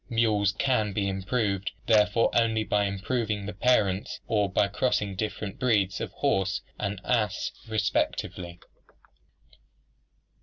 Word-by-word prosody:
Mules 110 -4 +2
can 110 -3 +1
be 100 0 0
improved 100 0 -1
therefore 105 +1 +4
only 110 -2 +2
by 105 -1 +1
improving 105 +1 -2
the 105 - -5
parents 100 -3 +1
or 105 -3 +1
by 100 - +3
crossing 105 -2 0
different 105 0 -4
breeds 105 -7 +1
of - - -3
the - - -28
horse 95 -1 0 0.2
and 100 -1 -2
ass 105 -5 0 0.2
respectively. 95 -4 -1
105 Hz, 120 wpm, -27 LUFS, 100-110 Hz, 0.2 s, therefore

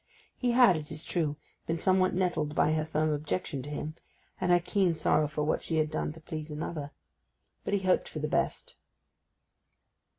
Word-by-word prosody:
He 245 -2 0
had, 235 -8 +6
it 150 -1 -7
is 155 +1 -2
true, 155 -4 0 0.3
been 165 - 0
somewhat 185 +2 +3
nettled 165 -5 0
by - - +3
her 155 0 0
firm 155 0 0
objection 145 -1 -2
to 145 - -7
him, 150 +1 -4 0.5
and 180 -1 +2
her 175 - +6
keen 180 -1 +1
sorrow 150 -1 +2
for 150 0 -2
what 150 - 0
she 165 - -3
had 155 -1 +1
done 155 - -1
to 165 - -12
please 155 -1 -5
another; 150 -1 -4 0.7
but 200 - 0
he 200 - 0
hoped 185 -1 +2
for - - -7
the 150 0 -1
best. - - -1
155 Hz, 190 wpm, -30 LUFS, 150-180 Hz, 0.7 s, had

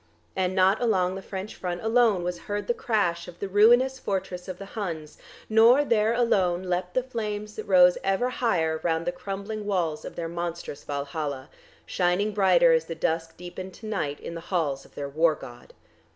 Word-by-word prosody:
And 185 0 0
not 190 +3 +3
along 185 -6 +2
the 190 - -6
French 195 +2 -6
front 180 0 -5
alone 225 -5 +3
was 175 0 -3
heard 205 0 -4
the 240 - +1
crash 175 -9 0
of 175 - -11
the 200 - -4
ruinous 240 +7 +4
fortress 190 -4 -3
of 185 -1 -6
the 195 - -8
Huns, 165 -8 -5 0.3
nor 230 +6 +6
there 220 -3 +2
alone 190 -7 +2
leaped 180 0 -2
the 255 - +2
flames 210 -4 -4
that 215 - -6
rose 180 -2 +6
ever 195 +6 +1
higher 160 -11 0
round 165 -1 0
the 175 - 0
crumbling 200 +4 -5
walls 170 -6 -1
of - - -8
their 165 - -3
monstrous 170 -3 -5
Valhalla, 140 -1 -4 0.4
shining 185 +4 0
brighter 180 -4 +5
as 160 0 +2
the 165 - -6
dusk 165 0 -2
deepened 180 +1 -8
to - - -12
night 170 -9 -2
in - - -7
the 165 - -6
halls 155 -7 -2
of - - -21
their 140 - -4
War 155 +3 +2
God. 120 -3 -12
185 Hz, 190 wpm, -26 LUFS, 170-210 Hz, 0.4 s, nor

